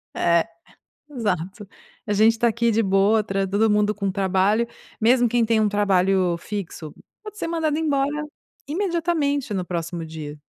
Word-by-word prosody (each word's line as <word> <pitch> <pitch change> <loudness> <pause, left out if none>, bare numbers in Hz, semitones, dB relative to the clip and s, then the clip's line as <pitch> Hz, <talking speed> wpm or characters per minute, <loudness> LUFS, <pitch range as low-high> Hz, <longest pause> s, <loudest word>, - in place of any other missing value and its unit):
É, 170 -1 +2 0.6
exato. 205 - -3 0.4
A 210 - 0
gente 215 +2 +5
está 235 +1 +1
aqui 235 +1 +1
de 225 - +2
boa, 195 +3 +3
tra 195 -1 -1
todo 210 +3 +2
mundo 210 0 +2
com 200 -1 -2
trabalho, 195 +3 +1 0.4
mesmo 245 +2 +4
quem 235 +1 +1
tem 225 0 +2
um 215 - +3
trabalho 190 -3 +2
fixo 175 -5 -6 0.3
pode 425 0 -10
ser - - -3
mandado 320 -3 0
embora 285 -3 +1 0.6
imediatamente 320 - -1
no 185 - -1
próximo 170 -1 -4
dia. 155 -2 -8
210 Hz, 155 wpm, -23 LUFS, 190-245 Hz, 0.6 s, gente